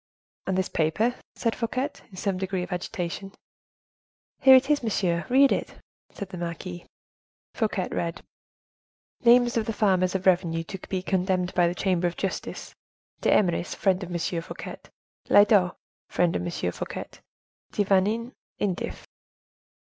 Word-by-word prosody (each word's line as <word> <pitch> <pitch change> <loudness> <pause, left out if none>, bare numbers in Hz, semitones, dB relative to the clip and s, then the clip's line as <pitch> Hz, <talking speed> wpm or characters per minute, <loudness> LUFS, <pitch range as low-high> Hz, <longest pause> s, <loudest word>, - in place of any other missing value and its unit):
"And 190 -1 0
this 190 - +1
paper?" 165 +10 +1 0.2
said 230 -2 -1
Fouquet, 255 +4 -2 0.2
in 195 - -14
some 190 -1 -1
degree 190 -1 -2
of - - -8
agitation. 180 +2 -4 1.1
"Here 265 -1 +9
it 260 +1 +5
is, 295 0 +2
monsieur—read 225 +5 +2
it," - - -1 0.4
said 200 -3 -7
the 185 -2 -7
marquise. 175 +1 -6 0.7
Fouquet 210 -5 -1
read: 170 -1 -3 1.0
"Names 240 0 +5
of 220 - 0
the 225 - -1
farmers 190 -3 +2
of 190 - -2
revenue 175 -3 +2
to 190 +3 -7
be 185 -1 -2
condemned 185 -1 0
by 175 -1 +4
the 175 - -2
Chamber 180 -2 +1
of 170 - -5
Justice: 195 - -4 0.5
D'Eymeris, 175 -3 +2
friend 190 -1 +1
of 180 - -6
M. 175 - -4
F.; 165 0 -3 0.8
Lyodot, 205 -3 +5 0.3
friend 175 -1 +1
of - - 0
M. 90 - -3
F.; 90 0 -3 0.9
De 205 - +1
Vanin, 210 +5 +2 0.3
indif." 195 -3 -2
190 Hz, 140 wpm, -26 LUFS, 175-215 Hz, 1.1 s, Here